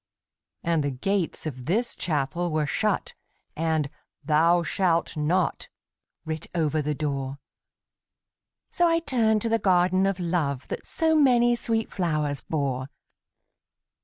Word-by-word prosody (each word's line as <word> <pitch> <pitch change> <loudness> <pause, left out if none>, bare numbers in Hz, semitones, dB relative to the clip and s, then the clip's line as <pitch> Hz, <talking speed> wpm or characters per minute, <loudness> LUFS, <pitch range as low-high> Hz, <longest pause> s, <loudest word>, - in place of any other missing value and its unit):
And 165 -3 +1
the 145 - 0
gates 175 +8 -2
of 130 -4 -6
this 230 +8 0
Chapel 165 +2 -1
were 155 -1 +1
shut, 210 +7 -1 0.4
And 160 -2 0 0.4
'Thou 165 +3 +4
shalt 170 -1 0
not' 165 +4 0 0.6
writ 160 -1 -4
over 155 -2 +1
the 150 0 -2
door; 140 -2 -3 1.3
So 350 -1 +3
I 330 0 +3
turned 225 -9 +1
to 230 - 0
the 225 0 +2
Garden 185 0 +3
of 195 -1 -1
Love 160 -6 -1
That - - -5
so 320 -1 +1
many 240 -5 +5
sweet 225 -1 -2
flowers 155 -6 -1
bore. 135 -4 -2
170 Hz, 130 wpm, -26 LUFS, 150-200 Hz, 1.3 s, many